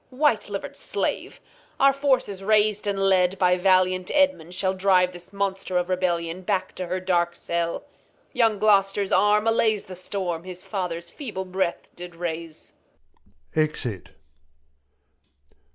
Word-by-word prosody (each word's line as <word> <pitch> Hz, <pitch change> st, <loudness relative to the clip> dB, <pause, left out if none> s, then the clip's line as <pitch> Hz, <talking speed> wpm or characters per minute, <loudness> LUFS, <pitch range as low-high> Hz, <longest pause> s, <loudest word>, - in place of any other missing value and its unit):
Reg. 255 Hz, -, -16 dB
White 265 Hz, -9 st, +2 dB
liver'd 275 Hz, +8 st, -5 dB
Slave! -, -, -3 dB, 0.4 s
Our 275 Hz, 0 st, +6 dB
Forces 260 Hz, -8 st, 0 dB
rais'd, 210 Hz, 0 st, +2 dB
and 200 Hz, -1 st, 0 dB
led 190 Hz, -1 st, +3 dB
by 180 Hz, -1 st, +3 dB
valiant 185 Hz, 0 st, +2 dB
Edmund, 280 Hz, -, +2 dB
ShaU 190 Hz, 0 st, 0 dB
drive 185 Hz, -1 st, +3 dB
this 175 Hz, +1 st, -11 dB
Monster 195 Hz, -2 st, -2 dB
of 180 Hz, 0 st, -1 dB
Rebellion 175 Hz, -1 st, -1 dB
back 190 Hz, 0 st, -1 dB
To 185 Hz, -, -4 dB
her 185 Hz, +2 st, -2 dB
dark 175 Hz, -2 st, 0 dB
CeU; 170 Hz, 0 st, -2 dB, 0.5 s
young 225 Hz, -3 st, +3 dB
Gloster' 200 Hz, -1 st, +3 dB
s 195 Hz, -, -6 dB
Arm 210 Hz, +1 st, +4 dB
allays 220 Hz, -2 st, +2 dB
The 185 Hz, -, -9 dB
Storm, 180 Hz, -2 st, -3 dB
his 185 Hz, 0 st, -8 dB
Father's 170 Hz, -4 st, -4 dB
feeble 210 Hz, -10 st, -5 dB
Breath 185 Hz, -1 st, -2 dB
did 175 Hz, -1 st, -9 dB
raise. 165 Hz, -2 st, -6 dB, 0.8 s
[Exit. 145 Hz, -, -2 dB
185 Hz, 140 wpm, -24 LUFS, 180-205 Hz, 0.8 s, Our